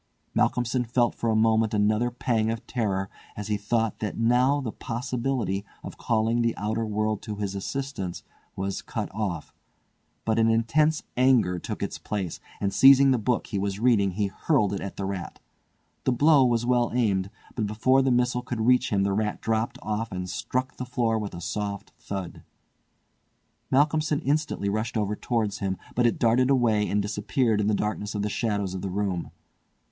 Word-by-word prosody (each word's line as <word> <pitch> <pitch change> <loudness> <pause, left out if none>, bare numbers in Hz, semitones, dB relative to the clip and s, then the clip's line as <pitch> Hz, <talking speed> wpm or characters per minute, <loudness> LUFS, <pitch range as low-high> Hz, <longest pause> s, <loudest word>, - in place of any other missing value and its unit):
Malcolmson 125 +1 +1
felt 120 0 +1
for 115 - -2
a 110 - +2
moment 110 0 +3
another 110 +3 +2
pang 115 -2 0
of 115 0 -4
terror 100 -5 -1 0.3
as 105 0 -5
he 105 - +2
thought 110 +2 -1
that 105 - -3
now 125 +5 +3
the 125 -6 -3
possibility 120 -5 -2 0.2
of - - -9
calling 115 +1 +1
the 115 -1 0
outer 110 +2 -1
world 110 0 -1
to 105 - -5
his 100 -1 -3
assistance 100 -3 -4 0.3
was 95 0 -3
cut - - -5
off, 95 -7 -3 0.7
but 110 0 +1
an 115 0 +4
intense 150 +8 +2
anger 120 -9 +3
took - - -5
its - - -4
place, 95 -5 -4 0.2
and 100 -1 -1
seizing 135 +4 +7
the 125 - +2
book 115 +2 0
he 100 - -3
was 100 0 -2
reading 105 -5 +3
he 105 +2 0
hurled 105 +1 +1
it 100 - -3
at 100 - -6
the 100 - -3
rat. 95 -3 -5 0.7
The - - +3
blow 145 +3 +5
was 120 -1 +1
well 120 -1 +2
aimed, 100 -6 +1 0.2
but 110 -4 -1
before 130 +6 +3
the 135 - +2
missile 125 0 +2
could 125 -2 -4
reach 125 +2 +3
him 100 -2 +1
the 100 0 +1
rat 105 +1 -1
dropped 110 +1 -1
off 110 +1 -2
and 90 -1 -4
struck 130 +7 -3
the - - -4
floor 115 -3 0
with 105 -4 -5
a 85 - -7
soft 100 +3 -4
thud. 95 -3 -6 1.3
Malcolmson 150 +2 +2
instantly 145 -7 0
rushed 110 +3 -1
over 105 -1 0
towards 110 -3 -1
him, 95 -1 -2 0.2
but 120 0 +3
it 115 - 0
darted 120 +3 +3
away 115 -6 +3
and 105 0 +1
disappeared 105 +2 0
in 105 - 0
the 105 - +2
darkness 105 0 -2
of 105 - -1
the 105 - -1
shadows 100 -3 -1
of 95 - -4
the 100 - -3
room. 95 -2 -2
110 Hz, 185 wpm, -26 LUFS, 100-125 Hz, 1.3 s, seizing